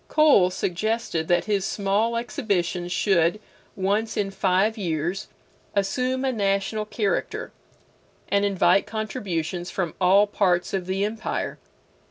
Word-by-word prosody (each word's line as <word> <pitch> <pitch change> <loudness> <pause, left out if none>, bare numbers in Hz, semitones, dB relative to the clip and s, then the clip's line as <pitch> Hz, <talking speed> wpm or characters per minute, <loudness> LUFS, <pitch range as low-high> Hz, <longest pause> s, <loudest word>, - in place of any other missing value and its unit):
Cole 290 -13 +5
suggested 185 -2 -2
that 175 0 +2
his 205 -3 0
small 205 +4 0
exhibitions 180 -7 -2
should, 185 0 +2 0.4
once 205 +3 0
in 200 -1 0
five 195 +3 +2
years, 175 -2 -2 0.5
assume 255 +7 0
a 265 - +2
national 200 -1 0
character, 210 -2 -2 0.8
and 200 0 +2
invite 195 -1 +3
contributions 185 -6 -3
from 175 -5 -2
all 195 +3 +6
parts 185 -4 +1
of 185 -2 -2
the 190 +2 0
empire. 215 +1 -3
195 Hz, 120 wpm, -24 LUFS, 180-215 Hz, 0.8 s, all